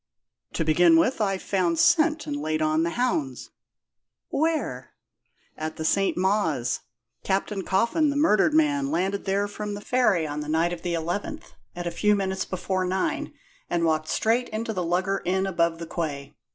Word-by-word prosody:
"To 165 - -1
begin 165 +1 +5
with, 225 +8 +2
I've 195 -2 0
found 180 -4 0
scent 310 - +3
and 295 - -3
laid 155 - -2
on 155 0 +2
the 170 - +1
hounds." 165 - -2 0.8
"Where?" 320 +2 -1 0.6
"At 155 0 -5
St. 195 +4 +1
Mawes. 170 - +1 0.4
Captain 195 +1 -1
Coffin, 235 - +2
the 285 - -2
murdered 295 0 +3
man, 290 -3 +2
landed 200 - -1
there 200 +1 +1
from 205 0 -5
the - - -6
ferry 205 -7 +2
on 150 0 -4
the 150 0 -5
night 165 +3 +1
of 170 - -7
the 175 -1 -2
11th, 200 - -4 0.2
at 175 0 -5
a 175 - -2
few 210 +5 +2
minutes 190 -1 -2
before 185 0 -2
nine, 185 +1 -1 0.4
and 170 -1 +1
walked 155 -1 +1
straight 235 +3 +1 0.2
to 225 - -3
the 185 -3 -2
Lugger 185 +3 0
Inn, 190 +2 0
above 170 -3 +1
the 165 - -6
quay. 150 -5 -4
190 Hz, 170 wpm, -25 LUFS, 165-215 Hz, 0.8 s, begin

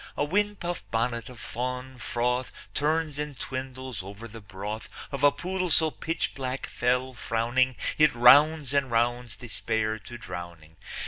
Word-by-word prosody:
A 145 - +2
windpuff 195 0 0
bonnet 115 +1 -1
of 125 -2 -11
fáawn 125 +2 -4
fróth 125 +1 0 0.2
Turns 155 0 0
and 150 -3 -4
twindles 130 -3 -5
over 100 +4 -9
the 115 0 -10
broth 100 +2 -6 0.2
Of 140 -1 -4
a 145 - +8
pool 185 +3 -2
so 160 -1 +4
pitchblack, 135 -5 -3
féll 125 +1 0
frówning, 120 +3 +1 0.2
It 155 -3 +6
rounds 145 +4 +6
and 140 -2 +2
rounds 120 0 +1
Despair 110 -2 -2
to 120 +3 -9
drowning. 85 -6 -8
125 Hz, 140 wpm, -28 LUFS, 115-145 Hz, 0.2 s, a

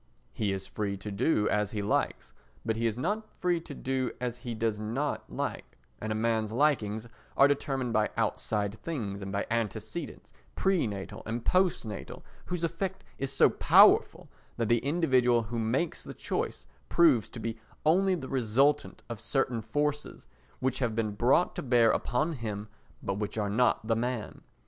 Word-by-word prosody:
He 105 -2 0
is 95 0 -3
free 100 -2 -3
to 105 +2 -6
do 105 +1 +2
as 105 -1 +1
he 105 -2 -3
likes, 105 - -1 0.3
but 110 -1 0
he 115 +1 +1
is 110 0 -2
not 205 - -2
free 175 -2 +1
to 150 -3 -9
do 130 -1 -1
as 125 -1 -3
he 120 -2 -5
does 110 -1 -1
not 120 +7 -3
like; - - -4 0.2
and 110 - -4
a - - 0
man's 110 -1 0
likings 115 -5 +1 0.3
are 140 - +8
determined 135 -3 -1
by 110 -1 +2
outside 105 -2 0
things 105 -12 -4
and 95 0 -5
by 100 0 -1
antecedents, 115 - -3 0.2
pre 190 -9 +2
natal 100 -2 -6
and 115 +1 -3
post 185 -7 +2
natal, 105 -2 -7 0.2
whose 180 -2 -3
effect 180 +3 -2 0.2
is 135 0 -2
so - - +5
powerful - - +5 0.3
that 115 -2 0
the 120 0 +4
individual 130 -5 +3
who 115 +2 -4
makes 125 +9 -1
the - - -8
choice - - -3 0.2
proves 150 -10 +4
to 120 - -8
be 115 0 -4 0.3
only 185 +4 +4
the 135 -7 -6
resultant 135 +4 +1
of 120 -3 -6
certain 120 -1 0
forces 145 +6 -2 0.3
which 130 0 0
have 120 -4 0
been 110 -2 0
brought 120 +11 +3
to - - -3
bear 120 -3 +4
upon 150 +7 0
him 110 -5 -5 0.3
but 100 +1 -2
which 105 +1 -3
are 105 -2 0
not 120 0 +2
the 115 0 +2
man. 120 -1 -3
120 Hz, 175 wpm, -29 LUFS, 110-140 Hz, 0.3 s, are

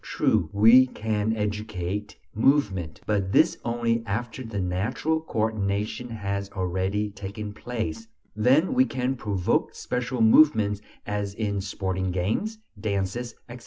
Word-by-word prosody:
True, - - +1
we 115 +5 +7
can 110 -2 -1
educate 105 -2 -3 0.2
movement; 105 - +1
but 100 -2 0
this 165 +1 +4
only 115 -1 0
after 115 +4 -3
the 110 -4 -4
natural 105 - -1
coordination 110 -2 -2
has 100 -3 -3
already 95 +3 -1
taken 100 +1 -6
place; 110 -3 -4 0.3
then 130 - +3
we 130 - +5
can 125 +2 -1
"provoke" 100 -7 0
special 125 0 -3
movements 110 -5 +5 0.2
as 105 -1 -3
in 100 -3 -1
sporting 95 -1 -2
games, 110 - -1 0.2
dances, 100 +3 -2
etc. 120 0 -9
105 Hz, 125 wpm, -26 LUFS, 100-120 Hz, 0.3 s, we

